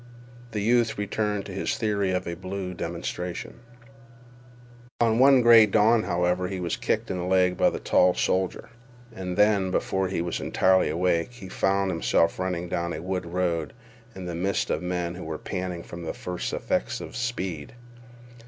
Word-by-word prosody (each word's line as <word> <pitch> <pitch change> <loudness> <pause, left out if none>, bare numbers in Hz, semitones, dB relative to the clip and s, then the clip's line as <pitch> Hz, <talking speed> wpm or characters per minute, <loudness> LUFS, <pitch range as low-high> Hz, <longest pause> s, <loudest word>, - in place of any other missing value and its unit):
The 110 -3 -3
youth 115 +1 +2
returned 105 0 -2
to - - -8
his 95 - -2
theory 100 -3 0
of 90 0 -1
a 85 - -3
blue 95 +1 -5
demonstration. 90 +6 -5 1.4
One 125 +3 +5
gray 115 -2 +8
dawn, 110 +2 +4
however, 90 0 0
he 95 0 -4
was 85 -2 -1
kicked - - -1
in 90 - -2
the - - -3
leg 90 -1 +3
by - - +3
the - - -4
tall 90 0 +3
soldier, 95 +3 -1 0.5
and 90 -3 -5
then, 105 -2 +3
before 95 +1 0
he 95 - -2
was 85 +1 -2
entirely 95 0 +3
awake, 85 +5 0
he 100 -6 -10
found 95 0 +1
himself 85 0 +1
running 90 -1 -2
down 85 0 -2
a 75 - -5
wood 90 -1 -3
road 85 -2 -1 0.4
in 95 -1 -7
the 90 - -4
midst 95 +4 -1
of - - -1
men 90 -1 -2
who 90 - -8
were 80 -1 -4
panting 90 -3 -4
from 85 - -9
the 80 - -5
first 90 -1 -4
effects - - -1
of - - -8
speed. 95 -9 -4
95 Hz, 170 wpm, -26 LUFS, 90-100 Hz, 1.4 s, gray